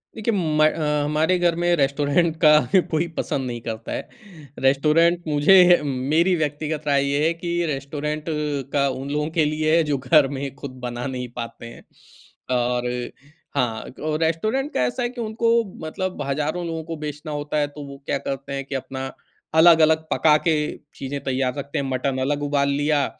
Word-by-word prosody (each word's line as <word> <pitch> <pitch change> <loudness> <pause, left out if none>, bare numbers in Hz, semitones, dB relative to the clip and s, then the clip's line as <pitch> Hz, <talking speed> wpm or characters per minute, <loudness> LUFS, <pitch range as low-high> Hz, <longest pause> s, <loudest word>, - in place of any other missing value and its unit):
देखिए, 225 +1 -1
म 160 -6 +1 0.4
हमारे 155 +5 +2
घर 175 -1 +2
में 175 0 +3
रेस्टोरेंट 145 +3 +1
का 155 - +8 0.4
कोई 160 +1 +1
पसंद 135 - -2
नहीं 120 -1 -4
करता 115 0 -6
है। - - -5 0.5
रेस्टोरेंट 155 +6 +3
मुझे 175 +4 +6
मेरी 150 +7 +1
व्यक्तिगत 155 0 -2
राय 140 -1 +3
ये 145 +2 +1
है 165 - +2
कि 170 +1 -6 0.2
रेस्टोरेंट 150 +1 -3 0.5
का 140 -1 +3
उन 135 +1 -5
लोगों 150 +1 -1
के 160 - +4
लिए 155 +1 +1
है, 165 - +4
जो 150 -2 0
घर 135 +2 +4
में 140 0 -5
खुद 140 -1 -8
बना 120 0 -4
नहीं 125 -2 -4
पाते 115 -1 -7
हैं। 115 - -11 0.7
और 125 0 0 0.7
हाँ, 120 -5 0 0.2
और 155 0 -1
रेस्टोरेंट 215 - -1
का - - 0
ऐसा 125 - -2
है 240 - 0
कि 245 -1 -7
उनको 230 +1 +1 0.3
मतलब 185 +1 -4
हज़ारों 150 +5 -2
लोगों 165 -1 -4
को 165 +1 -6
बेचना 150 +1 -6
होता 145 0 -3
है, 145 -1 +2
तो 145 0 -10
वो 140 0 -9
क्या - - 0
करते 135 0 -4
हैं 135 0 -4
कि 140 - -5
अपना 130 0 -4 0.5
अलग-अलग 160 -1 +6
पका 155 -1 +4
के 160 - +4 0.4
चीजें 140 +1 -5
तैयार 130 -1 0
रखते 140 0 -4
हैं। 140 - -2
मटन 130 +1 -1
अलग 145 +2 -1
उबाल 140 -1 +1
लिया, 145 0 +1
150 Hz, 180 wpm, -23 LUFS, 135-160 Hz, 0.7 s, का